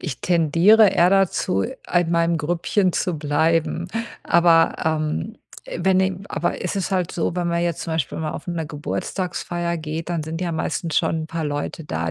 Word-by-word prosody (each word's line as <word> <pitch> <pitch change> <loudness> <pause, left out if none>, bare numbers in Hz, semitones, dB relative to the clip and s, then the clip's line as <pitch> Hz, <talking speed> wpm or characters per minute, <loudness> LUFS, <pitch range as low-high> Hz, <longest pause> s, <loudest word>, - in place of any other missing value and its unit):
ich 140 -8 -5
tendiere 175 +6 +5
eher 175 -1 +4
dazu, 190 - +2
in 175 - -1
meinem 170 0 +2
Grüppchen 175 +4 0
zu 180 -1 -1
bleiben. 160 +3 +1 0.4
Aber, 170 -1 +4
ähm, 155 - -1 0.4
wenn 185 +2 +3
em 190 0 -1
aber - - -2
es - - -2
ist 195 0 -2
halt 180 -3 0
so, 165 0 -1
wenn 175 -1 0
man 170 0 0
jetzt 170 -2 -1
zum 165 - -4
Beispiel 160 -6 -2
mal 155 -1 -3
auf - - -8
'ner 165 -2 -2
Geburtstagsfeier 175 +3 -3
geht, 160 +1 -5
dann 170 -2 -1
sind 160 +2 -5
ja 180 -2 -1
meistens 160 0 -1
schon 160 0 -1
'n - - -6
paar 165 0 -3
Leute 145 +2 -4
da, 80 - -2
165 Hz, 185 wpm, -22 LUFS, 155-175 Hz, 0.4 s, tendiere